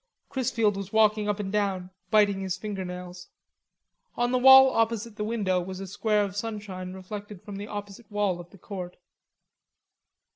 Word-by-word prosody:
Chrisfield 230 -6 +1
was 195 -1 -6
walking 215 -1 +3
up 205 0 -1
and 195 -2 -3
down, 195 -3 -1 0.2
biting 205 -3 +4
his 190 -2 -2
finger 205 -3 -4
nails. 180 0 -8 0.9
On 240 0 +1
the 255 - +2
wall 265 +1 +9
opposite 225 -1 0
the 210 - -3
window 205 -5 0
was 185 +1 -6
a 195 - -5
square 210 +2 +1
of 200 -2 -4
sunshine 205 -4 -5
reflected 200 +1 -8
from 205 -2 -7
the 205 +1 -6
opposite 205 +1 -8
wall 205 -4 0
of 175 0 -10
the 195 - -16
Court. 180 -1 -7
205 Hz, 170 wpm, -27 LUFS, 190-215 Hz, 0.9 s, wall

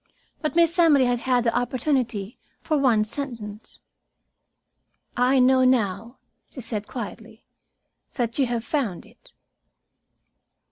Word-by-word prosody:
But 310 -1 -2
Miss 340 +1 +3
Emily 295 -6 +5
had 245 -1 +1
had 250 -1 +1
the 230 -1 0
opportunity 245 -4 -1 0.2
for 310 - 0
one 250 -7 +3
sentence. 215 -3 -7 1.3
"I 255 +2 +3
know 260 0 +5
now," 230 -2 0 0.3
she - - -10
said 215 -3 -4
quietly, 225 -1 -8 0.7
"that 235 0 -3
you 265 - +3
have 235 -1 -3
found 240 - -2
it." - - -20
245 Hz, 120 wpm, -24 LUFS, 225-270 Hz, 1.3 s, Emily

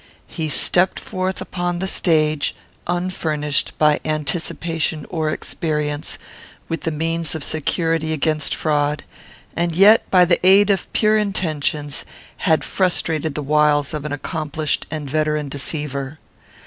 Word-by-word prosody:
He 160 -3 -4
stepped 175 +6 +2
forth 185 0 -3
upon 175 -1 -3
the 190 - -2
stage, 155 -5 +2 0.3
unfurnished, 160 -5 -1
by 150 -1 +3
anticipation 155 +1 -2
or 160 -3 -1
experience, 150 -2 -3 0.5
with 165 -2 -3
the - - -1
means 165 0 -2
of 155 - -4
security 160 +1 -1
against 155 -1 0
fraud; 150 -1 0 0.5
and 170 -1 -1
yet, 205 +5 +6
by 180 -1 +6
the 175 0 +1
aid 195 +2 +6
of 195 - -1
pure 215 0 +3
intentions, 155 -7 -2 0.3
had 160 -4 +2
frustrated 160 -5 0
the 150 - -3
wiles 150 0 +2
of 150 -2 -4
an 150 - -5
accomplished 155 +1 -2
and 150 -2 -5
veteran 150 0 -1
deceiver. 140 0 -3
155 Hz, 130 wpm, -20 LUFS, 150-175 Hz, 0.5 s, yet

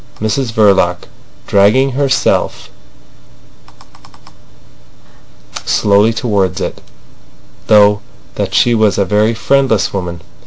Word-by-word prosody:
Mrs 115 +3 -2
Verloc, 100 -5 +1 0.4
dragging 110 +7 +2
herself 135 0 -1 2.9
slowly 105 +2 +2
towards 105 -5 -2
it, - - -5 0.9
thought 105 -1 +4 0.3
that - - -4
she 120 - +3
was 110 -3 +1
a 100 - +1
very 105 +3 0
friendless 135 -2 0
woman. 90 -3 -5
105 Hz, 85 wpm, -13 LUFS, 100-115 Hz, 2.9 s, thought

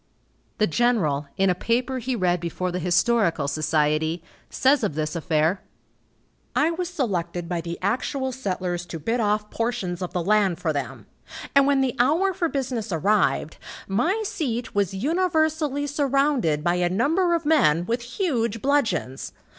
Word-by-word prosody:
The 215 - +3
general, 170 -9 +1
in 190 -1 +3
a - - +3
paper 245 +7 -1
he 255 +1 -2
read 180 -4 +1
before 175 +2 -3
the 180 - -3
Historical 180 - +2
Society, 155 +2 0 0.3
says 270 -1 +2
of 195 -9 -1
this 155 +1 -2
affair: 160 +2 +1 0.9
"I 315 +2 +3
was 350 +1 -3
selected 180 - -2
by 175 -1 -2
the 170 +1 -5
actual 260 +6 -1
settlers 185 -7 -3
to 165 - -6
bid 230 +10 -1
off 210 -1 0
portions 230 -7 -2
of 180 - -3
the 180 - -2
land 200 -2 +2
for 165 -3 -1
them, 140 -2 -5 0.5
and 280 0 +5
when 280 -1 +3
the 260 -3 0
hour 325 +10 +3
for 340 -1 -1
business 250 -7 -3
arrived, 185 -1 +1 0.3
my 335 - 0
seat 245 - -3
was 200 -2 0
universally 315 - 0
surrounded 275 - +1
by 175 +1 +1
a 175 0 +1
number 325 - +2
of 330 -2 -3
men 175 - +3
with 235 +4 -1
huge 240 - -1
bludgeons. 220 - 0
215 Hz, 155 wpm, -24 LUFS, 175-275 Hz, 0.9 s, and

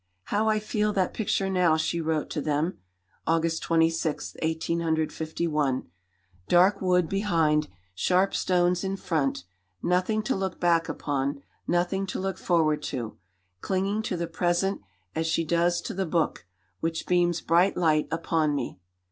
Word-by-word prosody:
"How 215 - +1
I 215 - +3
feel 210 0 0
that 185 -3 0
picture 200 -3 0
now," 180 -4 +3
she 165 +1 -1
wrote 160 -1 -1
to 150 - -2
them 150 - -1 0.5
(August 165 0 +1
26, 165 -1 +1
1851), 160 - -1 0.6
"dark 185 +3 +4
wood 180 -2 +3
behind, 160 -6 +1 0.3
sharp 185 - +2
stones 180 0 +2
in 195 0 -2
front, 155 - -1 0.4
nothing 185 +5 +1
to - - 0
look 190 -1 -3
back 170 -2 +2
upon, 140 0 -2 0.2
nothing 180 +3 0
to - - -4
look 190 0 -3
forward 155 -4 +2
to, 120 -7 -5 0.4
clinging 195 - -1
to 190 -5 -3
the 170 - -1
present 175 +3 0 0.3
as 160 0 -1
she 165 0 +1
does 170 +1 +2
to - - -5
the 190 -1 -2
book, 160 - -1 0.3
which 165 0 -2
beams 175 -1 +2
bright 175 +5 +3
light 155 -3 +2
upon 160 -2 0
me. 115 - -4
170 Hz, 145 wpm, -27 LUFS, 160-185 Hz, 0.6 s, dark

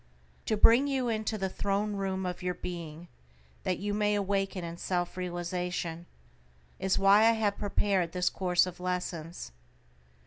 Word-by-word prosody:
To 215 - +1
bring 235 +6 +6
you 265 -3 0
into 220 -1 -1
the 190 -1 -1
throne 200 +2 -1
room 190 -1 -2
of 180 0 -4
your 180 0 -2
being, 170 -1 -7 0.5
that 185 - -1
you 205 +2 -2
may 210 0 +2
awaken 195 -2 -1
in 170 0 -6
self 175 -1 -2
realization, 175 -1 -3 0.7
is 190 0 +1
why 195 +1 +6
I 225 +1 +6
have 205 -2 0
prepared 195 -4 +1
this 180 0 +1
course 180 -2 +2
of 180 -1 -8
lessons. 180 - -4
185 Hz, 150 wpm, -30 LUFS, 175-205 Hz, 0.7 s, bring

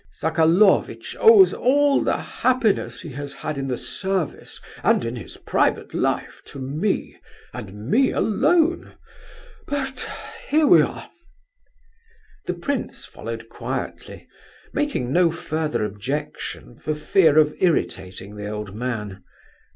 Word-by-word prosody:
Sokolovitch 165 +5 +2
owes 435 -4 +8
all 285 +2 +3
the - - +1
happiness 250 -5 0
he 165 - -8
has 140 +1 -6
had 155 - -4
in 135 0 -3
the 125 -2 -2
service 190 -5 -3 0.2
and - - +3
in 115 +1 -3
his 120 - -9
private - - 0
life - - -1
to - - -11
me, 150 +10 -2 0.4
and 105 -5 -8
me 260 - +4
alone, 330 - +1 0.7
but... 270 -2 -3 0.4
here 310 +1 +3
we - - +7
are." - - -3 1.4
The - - -1
prince 285 -1 -3
followed - - -7
quietly, - - -6 0.5
making 285 - -1
no 175 0 +5
further 155 -6 -2
objection 105 - -5
for 155 - -2
fear 155 0 +3
of 150 -1 +5
irritating 100 - -1
the 105 0 -5
old 105 -2 -5
man. 105 -4 -4
155 Hz, 120 wpm, -23 LUFS, -, 1.4 s, owes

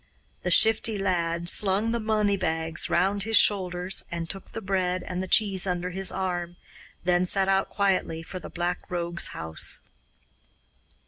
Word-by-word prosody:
The 180 - -2
Shifty 220 +3 +4
Lad 170 -3 -1
slung 200 +4 +3
the 235 - -1
money 215 -2 +1
bags 165 -3 -1
round 200 +2 +1
his 225 +2 +3
shoulders 180 -2 +2
and 170 -1 -4
took 195 +2 -8
the - - -5
bread 185 -3 -1
and 180 0 -4
the 190 - -4
cheese 195 -2 +4
under 180 0 -2
his 190 +1 +1
arm, 175 -2 -3 0.5
then 175 0 +2
set 190 +1 +2
out 195 0 +1
quietly 185 -5 0
for 185 +3 -7
the - - -9
Black 175 +1 -3
Rogue's 170 -1 0
house. 80 -1 -4
185 Hz, 155 wpm, -26 LUFS, 175-195 Hz, 0.5 s, Shifty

